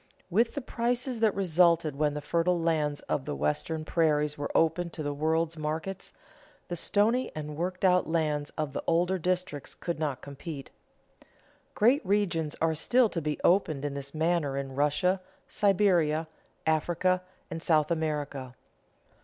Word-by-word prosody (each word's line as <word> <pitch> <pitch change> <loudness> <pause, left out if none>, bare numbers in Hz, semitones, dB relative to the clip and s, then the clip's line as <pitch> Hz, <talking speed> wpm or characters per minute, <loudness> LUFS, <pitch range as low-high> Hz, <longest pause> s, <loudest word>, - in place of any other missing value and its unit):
With 230 - +2
the 285 - -2
prices 245 0 -2
that 220 -2 +3
resulted 170 -5 +3
when 150 0 +1
the 150 - -3
fertile 170 +1 +1
lands 155 -3 0
of 135 - -2
the 145 0 -3
Western 155 +1 -1
prairies 150 -2 +2
were 145 0 -4
opened 165 +1 +1
to 155 - -4
the 145 0 -2
world's 160 +2 0
markets, 160 +5 -4 0.6
the 175 - -2
stony 220 +8 +1
and 150 -1 -5
worked 180 +4 -2
out 180 -2 +3
lands 150 -3 0
of 155 -3 -2
the - - -3
older 175 +3 +2
districts 180 -4 -2
could 170 -3 -4
not 145 -4 -2
compete. 140 0 -8 1.0
Great 245 +7 +4
regions 180 -6 0
are 165 0 +2
still 240 +9 +3
to 170 - -3
be 150 0 -2
opened 155 -6 +2
in 145 - -2
this 140 0 -5
manner 160 -3 +1
in 135 -1 -4
Russia, 150 +7 +1 0.3
Siberia, 175 -6 +2 0.4
Africa, 175 +3 +1 0.3
and 165 0 -4
South 155 -2 +2
America. 145 -5 -2
160 Hz, 155 wpm, -29 LUFS, 150-180 Hz, 1.0 s, Great